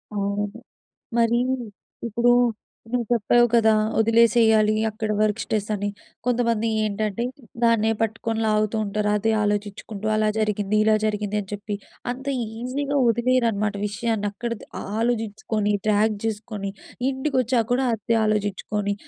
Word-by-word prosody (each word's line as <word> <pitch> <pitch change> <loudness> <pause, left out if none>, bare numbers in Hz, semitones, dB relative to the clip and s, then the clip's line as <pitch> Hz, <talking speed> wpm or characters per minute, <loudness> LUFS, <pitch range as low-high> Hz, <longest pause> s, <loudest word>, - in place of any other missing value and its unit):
అవును. 200 0 -1 0.7
మరి 235 0 +3 0.7
ఇప్పుడు 235 +2 +2 0.6
నువ్వు 245 -1 +1
చెప్పావు 240 +2 +4
కదా! 220 -1 +5 0.3
ఒదిలేసేయాలి. 225 -1 +4 0.2
అక్కడ 215 0 -3
వర్క్ 215 +1 +1
స్ట్రెస్ 210 -1 -2
అని 205 0 -2 0.4
కొంతమంది 235 -2 +1 0.2
ఏంటంటే 215 +2 -1 0.4
దాన్నే 225 -1 +3
పట్టుకొని 225 0 -1
లాగుతూ 215 0 +1
ఉంటారు. 210 +1 -1
అదే 220 +2 +1
ఆలోచిచుకుంటూ 205 0 -3
అలా 215 0 +2
జరిగింది. 210 -1 0
ఇలా 215 0 +4
జరిగింది. 210 -1 -2
అని 195 - -9
చెప్పి. 205 0 -4 0.4
అంత 265 +2 -10 0.3
ఈజీగా 280 +3 -2
వదిలేయరు 240 +1 +2
అనమాట 210 -1 -1
విషయాన్ని 215 0 -1
అక్కడతో 235 +1 -5 0.3
ఆలోచించుకొని. 220 -2 -1
డ్రాగ్ 215 0 +3
చేసుకొని. 210 -2 -4 0.4
ఇంటికి 265 +1 -2
వచ్చాక 235 -1 +1
కూడా 255 +1 +2
అదే 225 +1 0
ఆలోచించుకొని. 205 -1 -1
215 Hz, 125 wpm, -24 LUFS, 210-235 Hz, 0.7 s, కదా